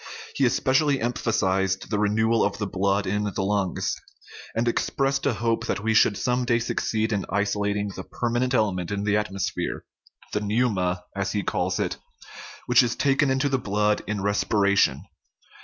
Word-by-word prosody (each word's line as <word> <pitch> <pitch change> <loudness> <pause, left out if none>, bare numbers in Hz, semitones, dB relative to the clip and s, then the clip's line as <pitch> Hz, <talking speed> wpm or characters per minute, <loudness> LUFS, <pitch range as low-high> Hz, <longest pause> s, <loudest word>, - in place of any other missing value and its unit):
He 135 - +2
especially 135 +3 +2
emphasized 95 -5 0
the 105 - +1
renewal 110 +2 +2
of 100 0 0
the 105 - -2
blood 100 +1 0
in 105 +2 -1
the 100 -1 -2
lungs, 100 -1 0 0.6
and 115 +2 0
expressed 135 +3 0
a 135 - +2
hope 115 0 -1
that - - -1
we 110 0 +1
should 110 -2 +4
some 125 0 0
day 120 -1 +2
succeed 110 -1 -1
in 100 -2 -1
isolating 100 0 0
the 95 - -6
permanent 120 +4 -1
element 95 -6 0
in 100 0 -2
the 105 0 +1
atmosphere 100 -3 -2 0.5
the 105 - 0
pneuma, 100 -5 0
as 100 0 -2
he 100 -2 -1
calls - - -1
it - - -1 0.7
which 125 +1 +6
is 120 -2 0
taken 140 +1 +2
into 135 +2 +1
the 135 -2 0
blood 105 -1 +1
in 105 -2 -2
respiration. 100 -6 +2
105 Hz, 165 wpm, -25 LUFS, 100-120 Hz, 0.7 s, which